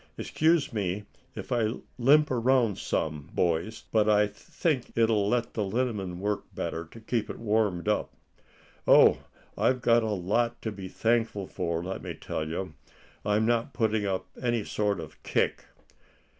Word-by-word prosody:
"Excuse 160 -4 +1
me 100 -1 -2 0.3
if - - -7
I 115 -2 +1 0.2
limp 150 +5 +5
around 120 -4 +2
some, 75 -1 -2
boys, 85 +6 0
but 110 -1 +3
I 105 0 +5
think 125 +6 -2
it'll 110 -3 +3
let 120 0 0
the 110 - -1
liniment 100 -4 -2
work 105 +2 -2
in - - -27
better, 85 +1 -3
to 95 +9 -13
keep 110 0 -2
it - - -5
warmed 105 -6 0
up. - - +1 0.8
Oh! - - +7 0.4
I've 125 -1 +1
a 115 0 +6
lot 110 +4 0
to 110 - -2
be 100 -2 -7
thankful 115 -1 0
for, 85 -2 -3
let 95 +2 -4
me - - -6
tell 80 - -4
you. 85 0 -4 0.5
I'm 105 +1 +2
not 115 +3 +1
putting 110 -3 +1
up 95 -1 -1 0.2
any 120 -3 0
sort 105 -3 -1
of 80 -2 -10
kick." - - 0
110 Hz, 155 wpm, -28 LUFS, 95-120 Hz, 0.8 s, Oh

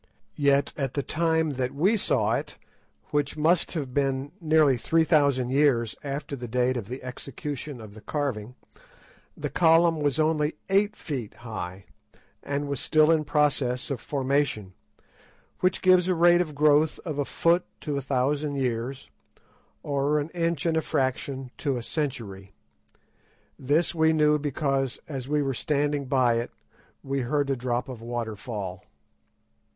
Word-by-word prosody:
Yet 140 -1 +3
at 135 -3 -3
the 140 - 0
time 160 0 +1
that 130 +2 -2
we 190 +10 +3
saw 210 - +2
it, - - -3 0.5
which 145 0 0
must 165 +4 +2
have 140 -7 -4
been 135 0 0
nearly 155 -4 +4
three 160 +7 +2
thousand 140 -6 +2
years 130 -5 +2
after 140 0 -4
the 120 -2 -7
date 125 +2 +1
of 115 -5 -4
the 125 +3 -7
execution 140 +1 -6
of 110 -2 -10
the 110 - -12
carving, 125 -5 -3 0.8
the - - -4
column 165 -1 +4
was 145 -1 0
only 155 -1 +1 0.2
eight 205 +2 +3
feet 130 - -5
high, 95 -4 -6 0.6
and 145 0 -3
was 140 -2 -3
still 155 0 +4
in 155 -2 +2
process 145 -4 +1
of 130 -4 -3
formation, 135 -8 -1 0.9
which 185 0 +1
gives 185 -1 +5
a 185 - +2
rate 175 +1 +5
of 155 -4 -4
growth 150 +1 +4
of 155 -4 -3
a - - +2
foot 170 +7 +2 0.2
to 150 -2 -3
a 140 - -1
thousand 140 +3 0
years, 130 0 -2 0.8
or 145 +1 +1
an 145 +2 -3
inch 170 -3 -1
and 165 -1 +2
a - - +2
fraction 135 -2 -2
to 140 -3 0
a 120 - -5
century. 110 -11 -4 1.1
This 145 +6 +2
we 160 -1 +3
knew 150 -1 +3
because, 135 -2 -1
as 135 -4 -5
we 150 0 +2
were 135 -1 -1
standing 145 +2 0
by 125 -3 +2
it, 120 - -4 0.5
we 135 0 -2
heard 140 +2 0
a - - +1
drop 120 -1 -2
of 125 -4 -8
water 115 -2 -4
fall. 100 -4 -6
140 Hz, 155 wpm, -26 LUFS, 125-155 Hz, 1.1 s, gives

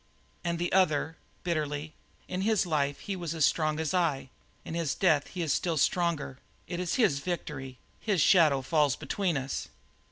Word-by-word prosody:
And 170 -1 -1
the 175 +1 -2
other, 160 -4 +2 0.3
bitterly: 155 -3 -2 0.3
"In 185 0 -3
his 215 -1 +2
life 145 -4 0
he 200 - -4
was 170 -3 -4
as 155 -4 +4
strong 155 -1 +1
as 160 +2 -1
I; 155 -8 0 0.3
in - - -6
his 165 -4 -1
death 155 -7 +3
he 180 -2 -4
is 150 -4 +1
still 170 -3 0
stronger. 160 -5 0 0.3
It 175 -1 -4
is 180 -2 -1
his 185 - +3
victory; 140 -5 -5 0.2
his 205 -5 0
shadow 150 -5 +5
falls 145 -1 +2
between 180 -3 -1
us." 135 0 -3
160 Hz, 170 wpm, -29 LUFS, 145-175 Hz, 0.3 s, shadow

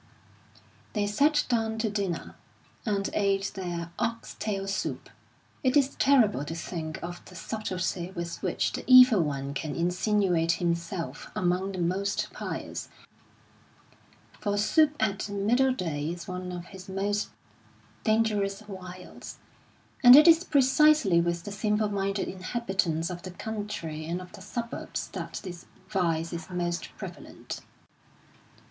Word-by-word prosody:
They 210 -2 +1
sat 285 +9 +3
down 225 -2 0
to 220 0 0
dinner, 195 -5 -2 0.5
and 200 -2 +1
ate 195 -1 +1
their 175 -3 -4
ox 230 0 -2
tail 195 -2 -2
soup. 195 - -3 0.5
It 260 +2 +4
is 280 -1 +2
terrible 235 - +4
to 165 +3 -5
think 160 -2 -5
of 175 0 -6
the 180 - -13
subtlety 185 -2 -3
with 170 -1 -5
which - - 0
the - - -4
Evil 255 -5 +9
One 140 -2 -2
can 155 -2 -3
insinuate 180 -1 +2
himself 170 0 -3
among 185 +2 0
the - - -5
most 190 +4 -1
pious; - - -5 1.5
for 205 -2 -1
soup 300 +8 +4
at 210 -1 0
middle 230 +7 +2
day 160 - -2
is 170 0 -6
one 180 0 -5
of 175 -1 -6
his 190 0 -11
most 205 +2 -1 0.7
dangerous 215 -2 +1
wiles, 185 -2 -9 0.7
and 245 0 +11
it 300 +4 +9
is 330 +1 +7
precisely 280 - +5
with 170 0 -1
the 205 - -6
simple 210 +1 +1
minded 195 0 -1
inhabitants 185 -4 -1
of 175 0 -6
the 185 - -7
country 180 -6 -5
and 170 +2 -2
of 180 0 -10
the - - -12
suburbs 235 +4 -5
that - - -6
this 180 -3 -8 0.2
vice 170 -5 0
is 170 +2 -6
most 175 -1 -2
prevalent. - - -8
195 Hz, 135 wpm, -28 LUFS, 175-215 Hz, 1.5 s, and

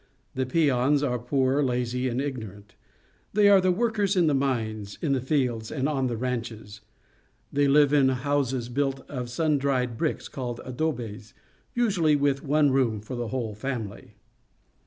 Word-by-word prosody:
The 130 -1 -2
peons 140 -1 +2
are 125 -3 0
poor, 130 +3 +1
lazy, 125 -1 0
and 120 +1 -2
ignorant. 110 -8 -6 0.6
They 205 0 +5
are 195 -1 +7
the 185 0 +3
workers 210 -1 +1
in 180 -2 +4
the 150 - +3
mines, 110 -7 -2
in 155 - -1
the 130 - 0
fields, 125 -5 -1
and 135 -2 -1
on 135 -4 0
the 120 -2 -3
ranches. 115 -4 -4 0.7
They 145 0 +3
live 145 0 +5
in 140 -2 +5
houses 130 -2 -1
built 135 +2 -2
of 125 -4 -5
sun 150 +3 +1
dried 125 -4 0
bricks, 160 - -1
called 120 -3 -5
adobes, 120 -6 -4 0.4
usually 190 -11 +2
with 140 -1 +1
one 145 0 +3
room 125 -5 +1
for 110 +5 -7
the 120 -1 -3
whole 115 -3 -3
family. 105 -3 -6
130 Hz, 160 wpm, -26 LUFS, 120-145 Hz, 0.7 s, are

